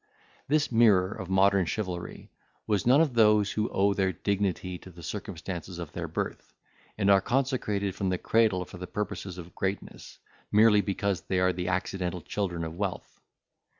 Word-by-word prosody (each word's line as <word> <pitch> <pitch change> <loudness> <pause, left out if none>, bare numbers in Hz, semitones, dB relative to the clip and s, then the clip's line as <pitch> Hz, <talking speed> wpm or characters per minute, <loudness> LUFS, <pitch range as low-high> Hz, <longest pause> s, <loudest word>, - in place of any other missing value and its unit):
This 150 0 +1
mirror 105 -5 +4
of 95 -3 -7
modern 95 -1 +3
chivalry 90 0 -5 0.3
was 105 0 0
none 135 +5 +6
of 155 -6 +1
those 105 -3 +4
who 110 +1 -1
owe 100 +1 +2
their 95 -1 +1
dignity 95 -1 -2
to - - -13
the 85 -1 -13
circumstances 90 -3 -6
of 85 -3 -6
their - - -4
birth, - - -5 0.4
and 100 -2 +1
are 95 -1 +6
consecrated 120 -6 0
from 95 0 -2
the 90 - 0
cradle 105 -3 +2
for 90 - -11
the 90 - -6
purposes 100 -2 -4
of 85 -1 -10
greatness, 95 +1 -5 0.3
merely 105 0 +6
because 100 -3 -1
they 95 +2 -1
are 90 0 +3
the 90 0 -4
accidental 95 -1 -2
children 90 -5 -3
of 80 0 -5
wealth. 100 0 -5
95 Hz, 170 wpm, -28 LUFS, 90-105 Hz, 0.4 s, none